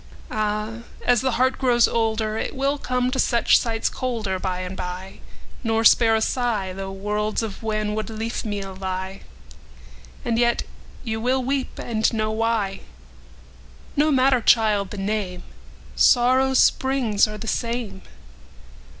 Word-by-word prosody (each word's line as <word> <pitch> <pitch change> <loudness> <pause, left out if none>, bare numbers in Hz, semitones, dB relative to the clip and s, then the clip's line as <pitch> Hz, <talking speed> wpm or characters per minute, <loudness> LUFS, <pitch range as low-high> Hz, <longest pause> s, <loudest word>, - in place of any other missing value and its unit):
Áh! 215 +1 -2 0.3
ás 245 -2 +4
the 260 -2 0
heart 255 +3 +1
grows 240 -3 +4
olderIt 220 -1 -1
will 275 +1 0
come 250 -1 -1
to 265 - -2
such 235 -2 +4
sights 225 -2 -1
colderBy 190 -7 -3
and 180 +1 -6
by, 180 +1 -6 0.4
nor 225 -1 +1
spare 225 -1 +6
a - - +2
sighThough 195 -6 -2
worlds 210 +3 -1
of 215 -3 -6
wanwood 215 -1 -2
leafmeal 215 -3 -4
lie; 190 0 -4 1.0
And 230 -1 0
yet 240 0 +2 0.4
you 220 -2 -3
wíll 255 +1 +1
weep 270 0 -2
and 220 -2 0
know 215 -1 -1
why. 220 -3 -1 1.2
Now 295 - +3
no 310 - +2
matter, 260 -2 +3
child, 215 -4 +3
the 205 - -7
name:Sórrow's 240 +6 +1
spríngs 255 -6 +1
áre 210 - -7
the 225 - -7
same. 230 -5 -3
225 Hz, 130 wpm, -23 LUFS, 205-245 Hz, 1.2 s, spare